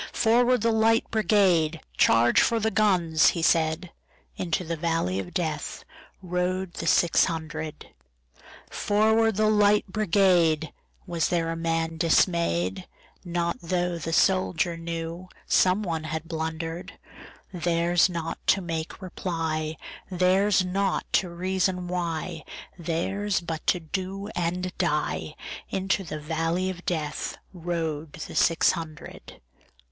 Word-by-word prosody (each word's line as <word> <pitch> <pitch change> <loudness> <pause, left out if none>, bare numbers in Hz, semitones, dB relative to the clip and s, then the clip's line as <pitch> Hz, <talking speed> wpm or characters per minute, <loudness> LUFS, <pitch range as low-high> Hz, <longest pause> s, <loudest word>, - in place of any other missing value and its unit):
"Forward, 240 +1 +3
the 230 +1 +2
Light 225 +1 +3
Brigade! 185 -7 +3 0.2
Charge 120 +1 +4
for 230 -1 +2
the 220 0 0
guns!" 180 -8 +3
he 165 - -2
said:Into 165 +1 -1
the 165 0 -3
valley 165 - -1
of 95 - -4
DeathRode 180 - -4
the - - -5
six 170 - +4
hundred."Forward, 160 - -2
the 215 +1 +2
Light 210 -1 +4
Brigade!"Was 175 -4 +1
there 165 -2 0
a - - -3
man 165 0 -1
dismay'd? 165 - +1 0.4
Not 170 -1 -2
tho' 175 0 -1
the 165 +1 -4
soldier 180 -1 +2
knewSome 170 +3 -1
one 165 -4 -3
had 160 +1 -4
blunder'd:Theirs 170 +2 -2
not 165 -2 -4
to 195 - +4
make 165 +1 -5
reply, 160 -4 -3 0.3
Theirs 185 +1 +3
not 195 +1 0
to 185 - +2
reason 180 +1 -1
why, 170 -2 -3 0.3
Theirs 190 +4 -1
but 165 -2 -6
to 180 - +3
do 190 +4 -5
and 180 +1 -2
die:Into 195 0 -2
the 155 -3 -6
valley 165 +4 -1
of 180 -1 -11
DeathRode 160 -1 -4
the 155 - -8
six 165 - +4
hundred. 160 -4 -8
170 Hz, 110 wpm, -26 LUFS, 160-190 Hz, 0.4 s, Charge